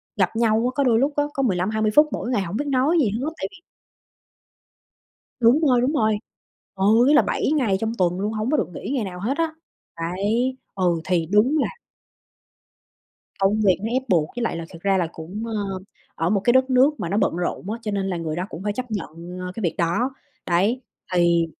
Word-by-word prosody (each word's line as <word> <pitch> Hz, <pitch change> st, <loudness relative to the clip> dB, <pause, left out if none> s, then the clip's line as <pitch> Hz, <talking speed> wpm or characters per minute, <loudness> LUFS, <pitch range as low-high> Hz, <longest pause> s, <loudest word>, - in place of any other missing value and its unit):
gặp 190 Hz, 0 st, +1 dB
nhau 225 Hz, -1 st, +3 dB
á, 250 Hz, -, +1 dB
có 280 Hz, -, +2 dB
đôi 235 Hz, -4 st, +3 dB
lúc 280 Hz, +3 st, +1 dB
á 290 Hz, -, +2 dB
có 275 Hz, -, -1 dB
15-20 215 Hz, +1 st, +1 dB
phút 300 Hz, +1 st, +7 dB
mỗi -, -, -3 dB
ngày, 245 Hz, -5 st, +1 dB
hổng 190 Hz, +1 st, -4 dB
biết 290 Hz, -, -2 dB
nói 280 Hz, +5 st, +2 dB
gì 250 Hz, -9 st, +3 dB
hết, 240 Hz, +9 st, -2 dB
tại -, -, -3 dB
vì 380 Hz, -, -14 dB, 1.8 s
Đúng 240 Hz, +6 st, +5 dB
rồi, 260 Hz, -6 st, +4 dB
đúng 255 Hz, +4 st, +1 dB
rồi. 215 Hz, -7 st, +2 dB, 0.6 s
Ừ, 190 Hz, -, -1 dB, 0.2 s
ý 295 Hz, -, +5 dB
là 300 Hz, -, +7 dB
7 -, -, -1 dB
ngày 225 Hz, -9 st, +2 dB
trong 225 Hz, 0 st, -1 dB
tuần 180 Hz, 0 st, +1 dB
luôn, 210 Hz, +2 st, -1 dB
hông 215 Hz, +3 st, -2 dB
có 305 Hz, -, +3 dB
được 175 Hz, -, -1 dB
nghỉ -, -, -6 dB
ngày 250 Hz, -5 st, 0 dB
nào 180 Hz, -2 st, -7 dB
hết 235 Hz, +8 st, 0 dB
á, 330 Hz, -1 st, 0 dB, 0.4 s
đấy, 205 Hz, +10 st, -1 dB, 0.2 s
ừ, 175 Hz, -4 st, +1 dB
thì 170 Hz, -2 st, +1 dB
đúng 210 Hz, -, +3 dB
là 280 Hz, -, +1 dB, 1.7 s
Công 200 Hz, +2 st, +2 dB
việc 190 Hz, -4 st, +3 dB
nó 225 Hz, -, -1 dB
ép 260 Hz, +1 st, +1 dB
buộc, 165 Hz, -6 st, +2 dB
với 245 Hz, -, -2 dB
lại 230 Hz, -, -1 dB
là 165 Hz, -, -5 dB
thật 170 Hz, -, -12 dB
ra 195 Hz, -1 st, +2 dB
là 175 Hz, -, +1 dB
cũng, 180 Hz, +7 st, -7 dB
ờ, 205 Hz, -4 st, -3 dB, 0.4 s
ở 165 Hz, +2 st, -1 dB
một 200 Hz, -1 st, +2 dB
cái 240 Hz, -, +5 dB
đất 260 Hz, +1 st, +3 dB
nước 265 Hz, +4 st, +4 dB
mà 170 Hz, -, -2 dB
nó 195 Hz, -, -1 dB
bận 210 Hz, -, +1 dB
rộn 180 Hz, +2 st, -3 dB
á, 225 Hz, -, -3 dB
cho 215 Hz, -, -3 dB
nên 200 Hz, -1 st, -1 dB
là 185 Hz, -2 st, -2 dB
người 160 Hz, -2 st, -3 dB
đó 180 Hz, -, -2 dB
cũng 165 Hz, -, -8 dB
phải 205 Hz, +1 st, -1 dB
chấp 250 Hz, +3 st, -5 dB
nhận, 170 Hz, -2 st, -6 dB
ờ, 180 Hz, 0 st, -5 dB
cái -, -, -6 dB
việc 170 Hz, -, 0 dB
đó, 205 Hz, +11 st, 0 dB, 0.3 s
đấy. 195 Hz, +9 st, +2 dB, 0.3 s
Thì 170 Hz, -1 st, +3 dB
210 Hz, 230 wpm, -23 LUFS, 180-250 Hz, 1.8 s, phút